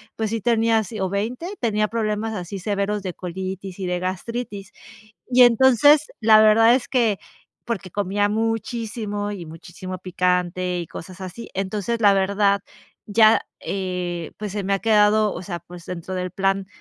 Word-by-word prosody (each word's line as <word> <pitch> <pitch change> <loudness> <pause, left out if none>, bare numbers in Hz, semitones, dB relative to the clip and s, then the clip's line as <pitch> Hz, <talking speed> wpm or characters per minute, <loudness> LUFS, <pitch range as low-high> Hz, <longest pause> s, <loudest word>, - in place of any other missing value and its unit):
pues 220 -1 -2
sí, 225 +1 -2
tenía 225 0 +2
si, 215 +1 -7
o 190 - 0
20 225 - -3
tenía 215 -3 0
problemas 220 -1 -2
así 190 0 -5
severos 200 +1 -2
de 185 -2 -4
colitis 185 +1 -6
y 190 - -3
de 180 0 -1
gastritis 200 +2 -5 0.6
y, 255 0 +4
entonces, 265 +5 +5
la 220 -1 +6
verdad 225 +2 +6
es 255 - -2
que 230 -6 +2 0.5
porque 195 -5 -3
comía 205 +2 0
muchísimo 220 -1 -2
y 180 -5 -7
muchísimo 175 +3 -8
picante 180 0 -1
y 170 - -4
cosas 185 +2 -10
así, 185 +5 -8
entonces, 205 +4 -2
la 205 -2 +6
verdad 200 +1 +2 0.5
ya, 220 +1 +5 0.2
eh, 180 -3 -4
pues, 210 -2 -5
se 205 0 -3
me 195 +1 0
ha 195 - 0
quedado, 215 -1 +3
o - - -6
sea, 180 -1 -5
pues, 175 +1 -13
dentro 180 +1 -6
del 180 0 -2
plan 195 +1 0
200 Hz, 165 wpm, -22 LUFS, 185-220 Hz, 0.6 s, la